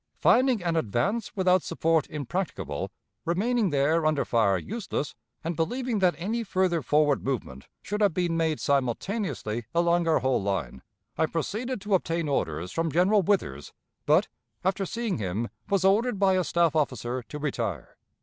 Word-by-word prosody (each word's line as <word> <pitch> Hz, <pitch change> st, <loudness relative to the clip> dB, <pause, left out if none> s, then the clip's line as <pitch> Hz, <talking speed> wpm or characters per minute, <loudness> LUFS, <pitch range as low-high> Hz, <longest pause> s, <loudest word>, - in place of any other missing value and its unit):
Finding 250 Hz, -6 st, +3 dB
an 170 Hz, -1 st, 0 dB
advance 160 Hz, -, -1 dB
without 185 Hz, -1 st, +3 dB
support 160 Hz, -1 st, 0 dB
impracticable, 135 Hz, -, -3 dB, 0.3 s
remaining 210 Hz, +5 st, +1 dB
there 150 Hz, +3 st, +2 dB
under 155 Hz, -2 st, +2 dB
fire 105 Hz, -5 st, +2 dB
useless, 200 Hz, -, -4 dB, 0.3 s
and 165 Hz, +1 st, -2 dB
believing 240 Hz, -, -1 dB
that 180 Hz, -3 st, +3 dB
any 220 Hz, +7 st, -2 dB
further 185 Hz, -5 st, +1 dB
forward 150 Hz, -1 st, +2 dB
movement 110 Hz, -, -4 dB, 0.2 s
should 210 Hz, +2 st, -3 dB
have 205 Hz, -2 st, +4 dB
been 175 Hz, -2 st, 0 dB
made 160 Hz, -2 st, 0 dB
simultaneously 135 Hz, -, -1 dB
along 170 Hz, 0 st, +3 dB
our 160 Hz, -, +4 dB
whole 130 Hz, -3 st, +1 dB
line, 90 Hz, -11 st, -2 dB, 0.4 s
I 160 Hz, -, +3 dB
proceeded 215 Hz, -, -3 dB
to 205 Hz, 0 st, -2 dB
obtain 170 Hz, -3 st, +1 dB
orders 85 Hz, -, -1 dB
from 165 Hz, +4 st, -1 dB
General 190 Hz, +6 st, +4 dB
Withers, 160 Hz, -, -1 dB, 0.3 s
but, -, -, +4 dB, 0.4 s
after 195 Hz, 0 st, 0 dB
seeing 230 Hz, -, -2 dB
him, 105 Hz, +4 st, -2 dB, 0.2 s
was 195 Hz, -2 st, +2 dB
ordered 210 Hz, +4 st, +3 dB
by 195 Hz, -1 st, +4 dB
a 185 Hz, -1 st, +2 dB
staff 170 Hz, -2 st, +2 dB
officer 125 Hz, -4 st, -1 dB
to 135 Hz, +5 st, -8 dB
retire. 115 Hz, -, -3 dB
165 Hz, 155 wpm, -27 LUFS, 130-195 Hz, 0.4 s, have